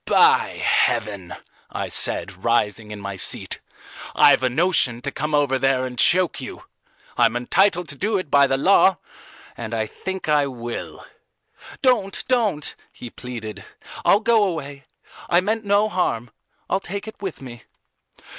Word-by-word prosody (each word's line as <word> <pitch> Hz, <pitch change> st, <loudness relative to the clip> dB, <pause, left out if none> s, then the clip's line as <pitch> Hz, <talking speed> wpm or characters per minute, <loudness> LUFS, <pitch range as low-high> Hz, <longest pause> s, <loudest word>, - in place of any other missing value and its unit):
By -, -, +4 dB
heaven," 100 Hz, -4 st, 0 dB, 0.3 s
I -, -, -4 dB
said, 95 Hz, +1 st, -1 dB
rising 110 Hz, -2 st, 0 dB
in 105 Hz, -1 st, -7 dB
my 100 Hz, -1 st, -6 dB
seat, -, -, -3 dB, 0.6 s
"I've -, -, +6 dB
a 130 Hz, -, +1 dB
notion 140 Hz, -4 st, +1 dB
to 140 Hz, -, 0 dB
come 150 Hz, +1 st, -2 dB
over 140 Hz, -2 st, +1 dB
there 135 Hz, -1 st, +1 dB
and 125 Hz, -2 st, -7 dB
choke 180 Hz, -5 st, +3 dB
you: 130 Hz, -, -8 dB, 0.6 s
I'm -, -, +4 dB
entitled 180 Hz, +8 st, +2 dB
to 140 Hz, -, -4 dB
do 205 Hz, +7 st, 0 dB
it 185 Hz, -6 st, -5 dB
by 140 Hz, -1 st, +5 dB
the 135 Hz, -, +1 dB
law, 190 Hz, +4 st, +4 dB, 0.6 s
and 115 Hz, -1 st, -5 dB
I 110 Hz, -1 st, -1 dB
think 190 Hz, -, -6 dB
I 150 Hz, -2 st, +3 dB
will." 120 Hz, -3 st, -7 dB, 0.8 s
"Don't, 220 Hz, -7 st, +1 dB
don't," 215 Hz, -, 0 dB, 0.2 s
he 120 Hz, -, -10 dB
pleaded. 115 Hz, -4 st, -8 dB, 0.4 s
"I'll 205 Hz, -, +4 dB
go 225 Hz, -1 st, +3 dB
away. 145 Hz, -7 st, -4 dB, 0.4 s
I 175 Hz, -, +5 dB
meant 215 Hz, +4 st, -2 dB
no 205 Hz, +1 st, +3 dB
harm. 125 Hz, -, -2 dB, 0.4 s
I'll 190 Hz, -, 0 dB
take 200 Hz, +2 st, -6 dB
it 220 Hz, -, -10 dB
with 190 Hz, -4 st, -5 dB
me." 120 Hz, -3 st, -11 dB
140 Hz, 155 wpm, -22 LUFS, 120-190 Hz, 0.8 s, I've